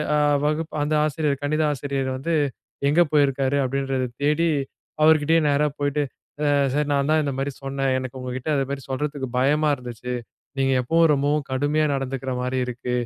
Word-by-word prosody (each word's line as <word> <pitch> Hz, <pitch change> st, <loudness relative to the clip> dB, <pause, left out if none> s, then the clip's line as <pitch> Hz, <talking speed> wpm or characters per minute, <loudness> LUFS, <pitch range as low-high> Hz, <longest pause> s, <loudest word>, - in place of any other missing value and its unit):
அ -, -, +3 dB, 0.3 s
வகுப் 155 Hz, +1 st, -1 dB
அந்த 150 Hz, +1 st, -1 dB
ஆசிரியர் 150 Hz, -2 st, -1 dB
கணித 155 Hz, +2 st, +1 dB
ஆசிரியர் 135 Hz, -1 st, -2 dB
வந்து, 165 Hz, +5 st, -2 dB, 0.6 s
எங்கே 170 Hz, +4 st, +5 dB
போயிருக்காரு? 140 Hz, -1 st, +2 dB
அப்டின்றத 135 Hz, -1 st, -1 dB, 0.2 s
தேடி, 155 Hz, +3 st, +2 dB, 0.5 s
அவரு 160 Hz, 0 st, +7 dB
கிட்டேயே 160 Hz, +2 st, +3 dB
நேரா 145 Hz, +1 st, +2 dB
போய்ட்டு, 145 Hz, +1 st, 0 dB, 0.4 s
அ -, -, +2 dB, 0.3 s
"சார், 150 Hz, 0 st, 0 dB
நான் 140 Hz, +1 st, +1 dB
தான் 155 Hz, -1 st, +3 dB
இந்த 140 Hz, -, -1 dB
மாரி 140 Hz, +1 st, -1 dB
சொன்னேன். 135 Hz, -1 st, -1 dB
எனக்கு 130 Hz, 0 st, -6 dB
உங்க 125 Hz, 0 st, -5 dB
கிட்ட, 130 Hz, +4 st, -6 dB
அந்த 135 Hz, -, +1 dB
மாரி 140 Hz, -1 st, -4 dB
சொல்றதுக்கு 140 Hz, -1 st, -3 dB
பயமா 150 Hz, +3 st, +3 dB
இருந்துச்சு. 125 Hz, 0 st, -6 dB, 0.4 s
நீங்க 135 Hz, 0 st, +2 dB
எப்பவும் 165 Hz, +4 st, +3 dB
ரொம்பவும் 145 Hz, +1 st, 0 dB
கடுமையா 145 Hz, +3 st, +1 dB
நடந்துக்கிற 135 Hz, 0 st, -3 dB
மாரி 130 Hz, +1 st, -1 dB
இருக்கு. 125 Hz, 0 st, -4 dB
140 Hz, 170 wpm, -23 LUFS, 130-150 Hz, 0.6 s, அவரு